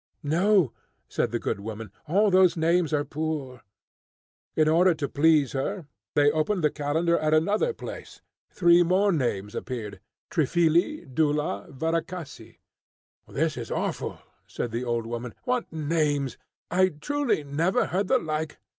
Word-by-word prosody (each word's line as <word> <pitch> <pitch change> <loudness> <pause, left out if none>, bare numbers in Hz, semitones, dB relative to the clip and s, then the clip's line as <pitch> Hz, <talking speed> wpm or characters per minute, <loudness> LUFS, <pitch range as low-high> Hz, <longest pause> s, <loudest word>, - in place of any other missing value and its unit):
"No," 170 - +3 0.3
said - - -1
the - - 0
good - - -3
woman, 110 0 -7 0.2
"all 200 +6 +3
those 185 -2 +5
names 165 0 +2
are 145 -1 +1
poor." 145 -5 -4 0.9
In 155 -1 +3
order 170 +3 +4
to 145 -2 -3
please 150 -2 +3
her, 160 +6 -3 0.3
they 145 0 +5
opened 155 +4 0
the 150 - +3
calendar 160 +4 0
at 155 0 +2
another 205 - +2
place; - - -9 0.3
three 175 -1 +5
more 185 +4 +3
names 110 - -1
appeared, 110 -6 -5 0.3
Triphily, 170 - +2
Dula, 145 -6 0
and - - -15
Varakhasy. 165 -4 -4 0.7
"This - - -1
is - - -6
awful," - - -3 0.3
said 120 - -4
the 120 +2 -2
old 120 -2 -1
woman. 120 +1 -5
"What 250 -1 -1
names! 150 -3 0 0.4
I 185 +2 +4
truly 240 - -1
never 165 - +1
heard 190 +2 -1
the 260 - +4
like. 155 - -3
155 Hz, 145 wpm, -26 LUFS, 140-180 Hz, 0.9 s, those